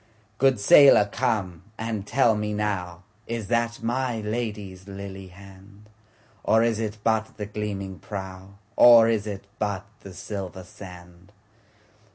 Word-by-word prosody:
Good 135 -4 +3
sailor 105 0 +7
come 100 -9 -1 0.2
and 110 -3 -4
tell 120 -2 +3
me 105 0 -3
nowIs 105 +3 -5
that 115 -1 -1
my 120 0 -1
Lady's 105 -4 -5
lily 95 -1 -8
hand? 100 +2 -16 0.5
Or 110 +1 +3
is 115 -2 0
it 110 -1 -3
but 110 -1 0
the 105 - -4
gleaming 100 -3 -5
prow, 95 -1 -8 0.2
Or 115 -2 +8
is 110 -2 0
it 100 -2 -6
but 100 -2 -2
the 95 -2 -12
silver 95 -1 -6
sand? 90 0 -13
105 Hz, 130 wpm, -25 LUFS, 95-115 Hz, 0.5 s, Or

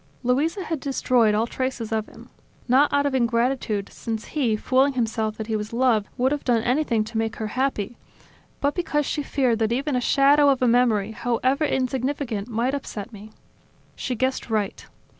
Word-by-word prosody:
Luisa 300 +10 +1
had 325 -4 -3
destroyed 250 -5 +2
all 220 +2 +2
traces 255 -2 -3
of 220 -1 -1
him. - - -15 0.4
Not 265 +4 +4
out 285 0 +2
of 285 - 0
ingratitude, 235 -4 0
since 225 -1 -5
he, 250 -8 +1
fooling 265 +5 +2
himself 220 -3 -1
that 220 - -4
he 220 0 -2
was 210 +1 -4
loved, 235 -4 +2
would 255 +2 +2
have 295 -1 -2
done 235 -3 +2
anything 245 -4 +1
to 220 +1 -4
make 225 0 -2
her 220 -2 -4
happy; 245 -3 -2 0.6
but 285 +1 +1
because 300 -4 -1
she 295 - -2
feared 255 -5 0
that 220 0 +1
even 275 +3 0
a 250 - +1
shadow 285 +3 +4
of 270 -2 +2
a - - +4
memory, 230 -4 +3
however 255 +6 0
insignificant, 255 -4 -2
might 240 +3 -1
upset 230 -6 -5
me. 210 +1 -11 0.7
She 255 - -3
guessed 260 +1 -1
right. 210 -3 -2
245 Hz, 180 wpm, -24 LUFS, 220-275 Hz, 0.7 s, Not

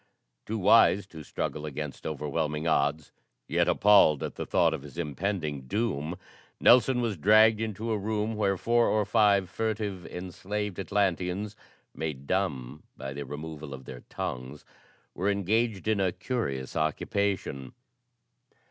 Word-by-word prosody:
Too 110 - -2
wise 100 -1 +5
to 80 -5 -11
struggle 75 +1 -4
against 75 -1 -5
overwhelming 75 +1 -2
odds, 75 -1 +1 0.4
yet - - +1
appalled 100 -8 +5
at - - -4
the - - -6
thought - - +3
of - - -4
his 75 +2 -12
impending 75 -4 -3
doom, 90 - -2 0.4
Nelson 125 +1 +5
was 110 -5 -1
dragged 110 +5 +5
into 110 +1 -3
a 110 - 0
room 110 +2 -1
where 100 -2 +1
four 120 +4 +2
or 105 -1 +2
five 100 -3 +3
furtive, 105 -2 -3
enslaved 95 +2 -5
Atlanteans, 100 +1 -1 0.4
made 75 -4 -5
dumb 75 -7 -2 0.2
by 65 0 -6
the 70 +1 -6
removal 75 0 -7
of 65 -1 -13
their 60 0 -9
tongues, 65 +3 -5 0.5
were 95 +3 -1
engaged 105 +2 0
in 110 -2 +2
a 95 -2 +2
curious 70 - -3
occupation. 80 -2 -1
95 Hz, 140 wpm, -28 LUFS, 75-105 Hz, 0.5 s, wise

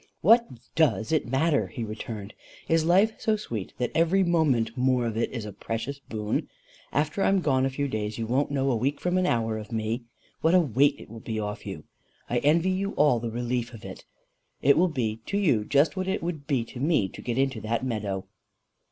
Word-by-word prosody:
"What 235 +5 +6 0.3
DOES 155 -7 +2
it 155 -5 +1
matter?" 140 +4 +2
he 120 - -6
returned. 110 -1 -6 0.3
"Is 165 -1 +3
life 190 +6 +4
so 220 - +1
sweet 115 - -5
that 125 - -1
every 170 +4 +3
moment 140 -10 +2
more 125 -1 +2
of 115 -2 -2
it 115 - 0
is 115 -4 -5
a 105 - -7
precious 115 +7 -4
boon? 110 -5 -3 0.4
After 150 +7 0
I'm 195 0 +3
gone 135 -6 +2
a - - -1
few 140 +2 -2
days, 110 -3 -3
you 115 - -2
won't 130 +5 +1
know 135 -1 +1
a - - +1
week 135 +5 -1
from 180 0 0
an 180 - +1
hour 115 -4 0
of 110 - -10
me. 115 +2 -2 0.4
What 165 +3 +4
a - - +7
weight 140 -1 +3
it - - -12
will 115 - -8
be 110 0 -4
off 105 -1 -5
you! - - -6 0.4
I 120 - +1
envy 165 +7 +3
you 195 +2 -1
all 145 -5 +3
the 115 0 -3
relief 120 +1 -2
of 110 - -12
it. - - -9 0.6
It 140 +1 +6
will 180 +4 +3
be 115 -8 -2
to 200 - -1
you 150 - +2
just 145 +4 +3
what 185 0 -2
it 190 - -1
would 160 -5 -4
be 130 -6 +1
to 120 - -10
me 145 - +2
to - - -10
get 120 -1 -3
into 135 -4 0
that 115 +3 -1
meadow." 105 -6 -3
130 Hz, 220 wpm, -27 LUFS, 115-160 Hz, 0.6 s, a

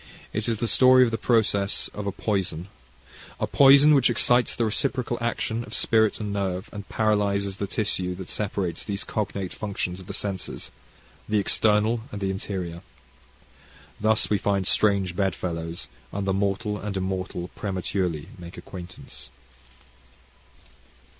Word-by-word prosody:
It 110 +2 -1
is 115 - 0
the 115 +2 -1
story 130 +2 +6
of 120 - +1
the 115 - -1
process 100 -4 +1
of 105 -1 -5
a - - 0
poison, 95 -4 -2 0.7
a - - +1
poison 140 +2 +7
which 135 -4 +5
excites 120 +1 +3
the 115 - +1
reciprocal 120 +2 0
action 115 0 -1
of - - -6
spirit 110 -1 +3
and 105 -2 -3
nerve, 95 -1 -2
and 100 -1 -8
paralyses 100 -3 +1
the 100 - -3
tissue 95 -3 -1
that 95 0 -8
separates 95 -5 -2
those 100 -2 -3
cognate 100 -3 -3
functions 95 -3 -4
of 95 - -11
the - - -5
senses, 100 -3 -4 0.6
the 105 - +2
external 110 +2 +3
and 105 - -5
the 95 -1 -1
interior. 90 -3 -5 1.2
Thus 110 +1 +2
we 105 - +1
find 100 -1 0
strange 100 -3 +2
bed 95 -2 0
fellows, 85 -3 -4 0.2
and 100 0 -3
the 95 - +1
mortal 100 +2 -1
and 100 -1 -4
immortal 95 -2 -3
prematurely 90 -5 -3
make 85 0 -10
acquaintance. 95 -1 -10
100 Hz, 145 wpm, -25 LUFS, 95-110 Hz, 1.2 s, poison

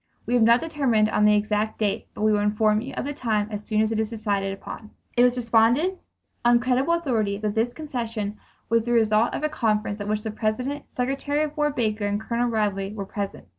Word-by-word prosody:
We 245 - -2
have 245 - +4
not 235 +2 +5
determined 265 -10 +1
on 210 - +3
the 210 0 +6
exact 210 +1 0
date 210 -2 -1
but - - -4
we 215 - +4
will 210 - +2
inform 210 +1 +2
you 265 +3 -6
of - - -2
the 290 - -3
time 220 -7 -1
as 210 0 -5
soon 215 -1 +1
as 220 0 +1
it 220 - 0
is 220 -1 0
decided 205 -4 -1
upon." 205 +2 -8 0.3
It 240 - +4
was 250 0 +4
reported 240 +10 +2 0.4
on 240 0 +5
credible 260 +6 +2
authority 225 -11 0
that 210 0 -2
this 225 +2 +1
concession 230 -8 -4 0.3
was 230 0 +2
the 240 - 0
result 220 0 +3
of - - -4
a - - +3
conference 215 -7 -1
at 205 - -4
which 215 0 -1
the 220 - -3
President, 250 +7 -2
Secretary 275 +4 0
of 300 -1 -4
War 295 0 +1
Baker 220 -6 -1
and 205 0 -1
Colonel 235 +2 -1
Ridley 205 -3 -1
were 200 -2 -4
present. 200 - -5
220 Hz, 225 wpm, -24 LUFS, 210-250 Hz, 0.4 s, the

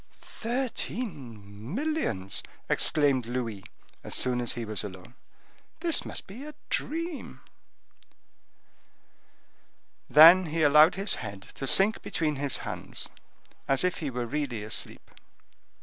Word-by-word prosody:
"Thirteen 150 - -5
millions!" 270 - -2 0.3
exclaimed 140 -6 +2
Louis, 115 -5 -3 0.4
as - - -2
soon 125 -1 +2
as 120 - 0
he 120 -1 -4
was 105 -3 -3
alone. 95 +2 -9 0.7
"This 335 -2 0
must - - -6
be 225 +8 -10
a 300 0 -9 0.2
dream!" 330 0 -3 2.7
Then 170 +4 +9
he 160 +1 0
allowed 150 +4 +7
his 195 +3 +2
head 100 -2 -7
to 135 - -5
sink 195 +9 +3
between 155 -3 -1
his 140 -1 0
hands, - - -5 0.6
as 135 +3 +3
if 180 -1 0
he 150 - -3
were 125 -1 -3
really 125 -4 -3
asleep. 110 - -2
145 Hz, 120 wpm, -28 LUFS, 115-195 Hz, 2.7 s, Then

